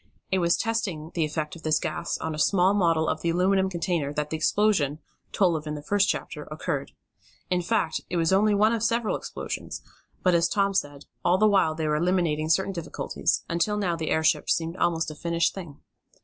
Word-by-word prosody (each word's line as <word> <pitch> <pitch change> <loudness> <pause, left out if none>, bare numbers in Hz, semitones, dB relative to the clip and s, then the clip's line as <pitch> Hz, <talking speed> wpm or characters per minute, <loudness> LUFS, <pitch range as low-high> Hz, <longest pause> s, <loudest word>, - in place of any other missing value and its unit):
It 190 - +2
was 170 -1 +2
testing 195 -9 -2
the 165 -3 +1
effect 150 +1 -4
of 170 - -11
this 155 -1 +2
gas 170 - -3
on 160 - -4
a 155 - -5
small 185 +3 +3
model 165 -5 +2
of 155 - -1
the 170 - 0
aluminum 190 +2 +2
container 170 -5 -1
that 150 0 -3
the - - -1
explosion, 160 -3 +2 0.3
told 180 -4 +2
of 155 -1 -5
in 150 - -3
the 145 - -8
first 200 +4 +2
chapter, - - -3
occurred. - - -4 0.6
In 180 -1 +2
fact 180 -2 0
it 180 - -1
was 165 +2 +2
only 205 +2 +4
one 215 +3 +4
of 230 - -1
several 230 0 +1
explosions, - - -6 0.4
but, 180 - +4
as 170 -1 +3
Tom 200 -1 +1
said, 145 -6 -2 0.2
all 175 +1 +3
the 215 - +4
while 195 -7 +3
they 160 -1 -2
were 150 0 +1
eliminating 165 -3 +1
certain 190 +3 +2
difficulties, 170 -3 -2
until 175 +5 0
now 185 -5 0
the 160 -1 -3
airship 160 0 +2
seemed 165 +1 0
almost 165 -3 0
a - - -9
finished 170 +1 0
thing. 170 -7 -9
170 Hz, 205 wpm, -26 LUFS, 155-195 Hz, 0.6 s, only